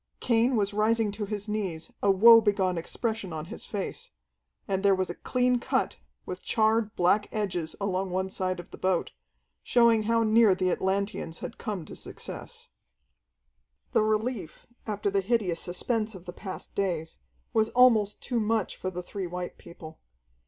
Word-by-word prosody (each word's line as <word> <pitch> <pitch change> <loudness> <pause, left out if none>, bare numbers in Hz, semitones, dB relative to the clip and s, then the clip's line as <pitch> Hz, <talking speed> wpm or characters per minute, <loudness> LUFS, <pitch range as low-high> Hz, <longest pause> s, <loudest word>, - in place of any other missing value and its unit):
Cain 235 +2 +2
was 205 -2 +1
rising 215 0 +2
to 210 +1 -4
his 205 0 -4
knees, 195 -7 -3
a 200 - +3
woe 230 +4 +8
begone 200 -4 +1
expression 215 +3 -3
on 155 -1 -5
his - - -8
face. 200 -2 -4 0.6
And 190 -1 0
there 200 -1 +4
was 185 -1 -1
a - - -5
clean 250 +4 +1
cut, - - -1 0.3
with - - -6
charred, 220 -1 +1
black 195 +4 +2
edges 180 -6 -2
along 195 -1 -1
one 185 +1 -1
side 185 -1 -2
of 175 - -10
the - - -11
boat, 185 -2 0 0.5
showing 235 -2 +4
how 230 0 +3
near 220 -2 +5
the 185 -1 +1
Atlanteans 190 -3 -1
had 240 - -8
come 205 -8 -4
to - - -10
success. - - -8 1.2
The - - +4
relief, 215 -4 -1 0.2
after 205 -1 -1
the 200 0 +2
hideous 195 -5 0
suspense 220 +4 -2
of 180 -1 -11
the 175 - -7
past 190 0 -8
days, 175 -5 -2 0.3
was 220 0 +3
almost 225 -5 +4
too 245 -2 -1
much 220 -2 0
for 185 - -3
the 180 -1 -6
three 190 +1 -5
white 180 +1 -6
people. 160 -2 -12
200 Hz, 165 wpm, -28 LUFS, 185-220 Hz, 1.2 s, woe